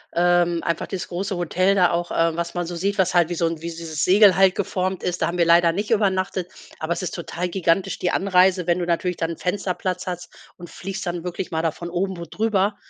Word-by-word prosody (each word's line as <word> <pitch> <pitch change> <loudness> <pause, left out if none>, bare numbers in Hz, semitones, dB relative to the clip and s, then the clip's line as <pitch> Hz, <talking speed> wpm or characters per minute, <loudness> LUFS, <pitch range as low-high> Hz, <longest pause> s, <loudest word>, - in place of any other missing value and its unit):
ähm 175 -1 +2
einfach 170 -1 -2
das 190 -2 -5
große 190 +2 -3
Hotel 185 +3 +1
da 180 -2 +4
auch, 170 0 -1
äh, 165 -1 +1
was 170 +1 -4
man 175 0 -1
so 175 +1 -6
sieht, 200 +4 -1
was 190 -1 +2
halt 175 -2 +3
wie 175 - -2
so 170 - 0
'n 165 0 -1
wie 170 - -4
dieses 165 -2 -4
Segel 195 0 +6
halt 190 0 +4
geformt 185 -1 -2
ist, 175 -1 -2
da - - +2
haben 175 - -3
wir 170 - +3
leider 170 0 +5
nicht 205 +6 -3
übernachtet, 190 -4 0 0.3
aber 160 +2 -1
es 180 - -5
ist 185 - -4
total 175 +1 -4
gigantisch 180 0 0
die 180 - 0
Anreise, 185 -1 +3
wenn 175 +1 +1
du 175 - -2
natürlich 175 +1 0
da 165 - -1
'n 165 -1 -6
Fensterplatz 185 0 -2
hast 180 -1 -5 0.3
und 175 - -10
fliegst 195 +2 -6
dann 175 -1 -3
wirklich 180 +1 -5
mal 160 -1 0
da 165 - +1
von 170 +2 -8
oben 185 +1 -2
wo 170 - -6
drüber, 205 +2 0
180 Hz, 245 wpm, -22 LUFS, 170-190 Hz, 0.3 s, Segel